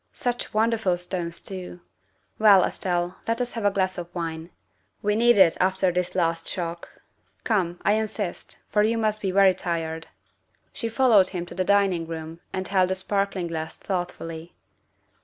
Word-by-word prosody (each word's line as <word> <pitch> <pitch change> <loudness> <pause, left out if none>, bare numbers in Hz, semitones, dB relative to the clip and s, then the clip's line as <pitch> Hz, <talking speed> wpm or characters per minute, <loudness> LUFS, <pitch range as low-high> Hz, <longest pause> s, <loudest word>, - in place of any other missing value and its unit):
Such 245 -1 -2
wonderful 220 -4 +1
stones 175 -1 -4
too! 185 -2 -7 0.6
Well, 205 -4 +7
Estelle, 175 0 -1
let 230 +1 0
us 245 -1 -1
have 225 -3 -4
a - - +6
glass 190 -2 -1
of 170 -1 -6
wine. 165 -1 -4 0.5
We 210 0 +2
need 240 0 +4
it 185 -4 +6
after 190 0 +2
this 180 0 -2
last 165 -2 0
shock. 170 -2 -4 0.5
Come, 180 -6 0
I 205 - +5
insist, 215 -3 -2
for 210 - +2
you 225 +2 +2
must 215 -1 0
be 195 - -1
very 190 0 +5
tired." 165 -2 -3 0.7
She 230 - -3
followed 225 -5 +5
him 175 -2 -4
to - - -10
the 185 - 0
dining 190 -4 +2
room 165 0 -7
and 185 -1 -3
held 185 -2 +2
the 190 - 0
sparkling 195 -1 -1
glass 160 -1 -5
thoughtfully. 170 -3 -5
185 Hz, 165 wpm, -25 LUFS, 170-205 Hz, 0.7 s, Well